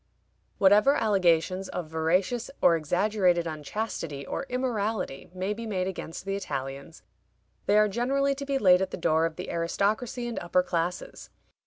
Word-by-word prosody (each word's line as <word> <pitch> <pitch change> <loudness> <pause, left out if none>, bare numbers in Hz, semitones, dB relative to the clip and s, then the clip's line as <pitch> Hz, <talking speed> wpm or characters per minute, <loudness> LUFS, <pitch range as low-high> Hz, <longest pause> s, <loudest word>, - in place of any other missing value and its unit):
Whatever 210 +8 +5
allegations 185 -2 +2
of 180 - -4
veracious 180 +9 0
or 170 - +5
exaggerated 180 +2 +1
unchastity 155 -2 -4
or 275 - -4
immorality 220 - -2
may 185 +3 -2
be 230 +2 -7
made 185 -4 -1
against 185 -2 -6
the 195 0 -2
Italians, 140 -4 -6 0.6
they 205 - +4
are 215 0 +5
generally 270 +6 +1
to 280 0 -6
be 275 -1 +1
laid 185 -6 +5
at 190 - 0
the - - -6
door 160 -1 +2
of 160 - -9
the - - -6
aristocracy 210 +8 -1
and 235 - -3
upper 175 +1 +1
classes. 170 - -3
190 Hz, 155 wpm, -27 LUFS, 165-220 Hz, 0.6 s, Whatever